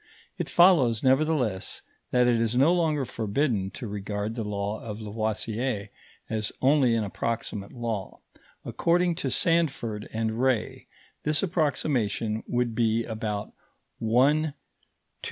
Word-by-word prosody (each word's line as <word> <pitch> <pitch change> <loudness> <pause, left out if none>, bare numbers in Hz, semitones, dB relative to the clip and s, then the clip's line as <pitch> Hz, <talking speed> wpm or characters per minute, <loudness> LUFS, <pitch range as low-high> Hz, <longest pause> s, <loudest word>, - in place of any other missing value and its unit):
It - - -2
follows 150 - +5
nevertheless 130 -7 +1 0.3
that 125 0 +3
it 120 -2 +3
is 115 +1 0
no 140 +7 +5
longer 155 -5 +1
forbidden 110 -3 -1
to 125 - -5
regard 105 +1 -3
the 115 -1 -3
law 105 0 -3
of 105 -1 -6
Lavoisier 110 +1 -2 0.4
as 110 -1 -1
only 130 -3 +4
an 115 - +1
approximate 105 -1 -3
law; 115 -5 -4 0.5
according 175 +1 +2
to - - -2
Sandford 140 - +1
and 110 +1 -2
Ray, 130 -4 0 0.3
this 150 +3 0
approximation 130 - 0
would 120 -1 0
be 115 0 +1
about 110 -2 -4 0.5
1/2,400,000. 140 +7 +3
115 Hz, 120 wpm, -27 LUFS, 110-140 Hz, 0.5 s, follows